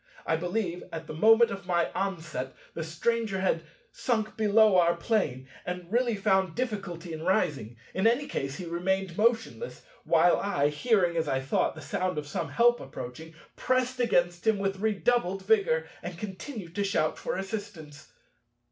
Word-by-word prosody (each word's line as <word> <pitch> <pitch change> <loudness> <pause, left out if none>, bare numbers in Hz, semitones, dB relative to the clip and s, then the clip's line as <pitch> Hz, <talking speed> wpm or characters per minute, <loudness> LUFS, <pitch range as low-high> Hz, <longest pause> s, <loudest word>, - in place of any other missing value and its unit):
I 160 - +2
believe, 180 +1 -2
at 165 0 -6
the 155 - -7
moment 225 +8 +5
of 195 -1 -7
my 175 -2 +1
onset, 165 -9 -3 0.2
the 165 - -4
Stranger 200 +5 -1
had 185 -3 +1 0.3
sunk 230 -2 -1
below 215 -2 +5
our 170 0 +4
Plane, 170 - -1 0.2
and 180 0 -6
really 240 -1 +2
found 190 -3 +1
difficulty 195 -9 -4
in 155 - -6
rising. 150 - 0 0.2
In 190 +4 +2
any 240 +5 +2
case 135 - -3
he 180 - -6
remained 180 +1 -1
motionless, 230 - 0 0.2
while 170 +1 +4
I, 145 -8 +1
hearing, 175 +1 +2
as 160 -1 0
I 135 -2 +1
thought, 135 +4 0
the 155 - -9
sound 180 +4 -2
of 150 - -2
some 165 +3 -3
help 240 0 +4
approaching, 160 +7 -8 0.2
pressed 255 0 0
against 175 -5 +1
him 220 -2 +4
with 195 -1 -2
redoubled 205 -2 +1
vigor, 190 -7 +3
and 175 -1 -6
continued 195 - -7
to 200 - +2
shout 155 -6 0
for - - -3
assistance. 190 -7 -7
185 Hz, 165 wpm, -28 LUFS, 165-220 Hz, 0.3 s, moment